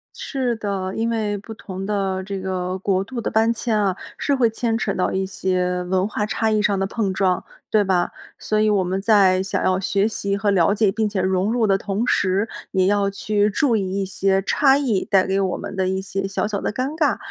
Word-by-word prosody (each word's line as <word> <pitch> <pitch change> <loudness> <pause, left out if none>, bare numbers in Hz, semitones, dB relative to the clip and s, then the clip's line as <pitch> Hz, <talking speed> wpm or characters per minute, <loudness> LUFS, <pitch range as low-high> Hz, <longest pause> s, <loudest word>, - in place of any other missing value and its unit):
是 255 -4 -2
的， 195 -3 -3
因 225 +1 0
为 215 -3 -1
不 205 +3 -9
同 195 -3 -7
的 195 -2 -1
这 195 0 -5
个 185 -1 -3
国 190 -1 +1
度 235 +3 -6
的 - - -3
搬 225 +1 +3
迁 225 -2 0
啊， 195 -3 +1 0.2
是 285 - +1
会 245 -4 +3
牵 225 0 -1
扯 210 -3 -1
到 185 - 0
一 190 0 -1
些 180 -1 -1
文 185 +1 0
化 210 0 -2
差 220 +1 0
异 215 -1 +2
上 205 -1 +1
的 195 - 0
碰 200 -1 -2
撞， 185 -2 +1 0.3
对 215 - +3
吧？ 185 -3 +1 0.3
所 215 - -1
以 215 0 +3
我 200 -3 +2
们 185 +2 -2
在 195 -3 +4
想 190 0 -2
要 185 0 +2
学 195 +1 +1
习 200 -2 -2
和 200 0 +1
了 185 -1 +3
解 210 -1 +2
并 220 +1 0
且 200 -2 -1
融 190 +3 +1
入 240 -2 +2
的 195 -2 +3
同 200 +3 -2
时， 200 -2 +1 0.2
也 185 -1 +2
要 200 0 +2
去 205 +1 0
注 235 +2 +2
意 195 0 -2
一 - - -1
些 195 0 +1
差 270 +7 +3
异 245 -9 0
带 190 -1 +4
给 195 +1 0
我 190 -2 0
们 200 0 -7
的 190 -1 +1
一 190 0 -1
些 195 0 -3
小 195 - -2
小 205 -1 -2
的 - - -3
尴 255 +4 -1
尬。 305 -3 +2
200 Hz, 250 characters per minute, -22 LUFS, 190-215 Hz, 0.3 s, 在